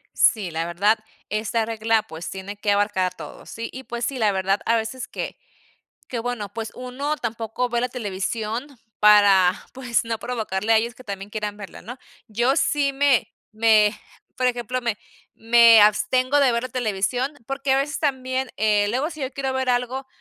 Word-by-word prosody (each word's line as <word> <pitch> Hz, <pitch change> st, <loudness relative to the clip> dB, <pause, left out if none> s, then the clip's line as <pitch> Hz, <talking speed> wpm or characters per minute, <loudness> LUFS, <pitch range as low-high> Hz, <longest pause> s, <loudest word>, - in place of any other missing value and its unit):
Sí, 200 Hz, -6 st, +3 dB
la 165 Hz, +1 st, -2 dB
verdad, 200 Hz, +6 st, +2 dB, 0.3 s
esta 220 Hz, +1 st, -1 dB
regla, 225 Hz, -1 st, +1 dB
pues 165 Hz, -3 st, -8 dB
tiene 195 Hz, +2 st, -7 dB
que 205 Hz, 0 st, 0 dB
abarcar 200 Hz, -3 st, +1 dB
todo, -, -, -11 dB
sí. 230 Hz, +1 st, -6 dB
Y 260 Hz, -, -8 dB
pues 240 Hz, -1 st, -4 dB
sí, 265 Hz, +1 st, -3 dB
la 215 Hz, -3 st, +2 dB
verdad, 195 Hz, +1 st, 0 dB
a 230 Hz, -, +3 dB
veces 230 Hz, +3 st, -3 dB
que -, -, -6 dB, 0.7 s
que, 245 Hz, -, -3 dB
bueno, 230 Hz, -3 st, -3 dB
pues 225 Hz, -1 st, -5 dB
uno 270 Hz, +4 st, -3 dB
tampoco 230 Hz, 0 st, -3 dB
ve 240 Hz, 0 st, 0 dB
la 250 Hz, -, -1 dB
televisión 225 Hz, +2 st, -3 dB, 0.3 s
para 200 Hz, -3 st, +6 dB, 0.2 s
pues 245 Hz, -3 st, -1 dB
no 225 Hz, -1 st, -2 dB
provocarle 220 Hz, -4 st, -2 dB
a -, -, +6 dB
ellos 235 Hz, +2 st, -1 dB
que 255 Hz, -, -14 dB
también 200 Hz, -2 st, -6 dB
quieran 210 Hz, -1 st, -4 dB
verla, 200 Hz, -2 st, -10 dB
¿no? 245 Hz, +3 st, -9 dB, 0.3 s
Yo 240 Hz, +5 st, +1 dB
sí 280 Hz, -2 st, +1 dB
me 275 Hz, -3 st, +2 dB, 0.2 s
me 215 Hz, -1 st, +4 dB, 0.4 s
por 255 Hz, -1 st, +2 dB
ejemplo, 245 Hz, +1 st, -2 dB
me 230 Hz, -3 st, -1 dB, 0.4 s
me 230 Hz, -1 st, +7 dB
abstengo 255 Hz, +7 st, +3 dB
de 275 Hz, -3 st, +4 dB
ver 235 Hz, +1 st, -1 dB
la 255 Hz, -, -4 dB
televisión 245 Hz, +3 st, -1 dB
porque 275 Hz, 0 st, 0 dB
a -, -, +3 dB
veces 290 Hz, +3 st, -1 dB
también, 260 Hz, -3 st, -1 dB
eh, 210 Hz, -1 st, +2 dB
luego 260 Hz, +7 st, -1 dB
si 310 Hz, -, -10 dB
yo 265 Hz, 0 st, -3 dB
quiero 270 Hz, -1 st, -3 dB
ver 260 Hz, -1 st, -1 dB
algo, 250 Hz, +2 st, -1 dB
230 Hz, 185 wpm, -23 LUFS, 210-255 Hz, 0.7 s, me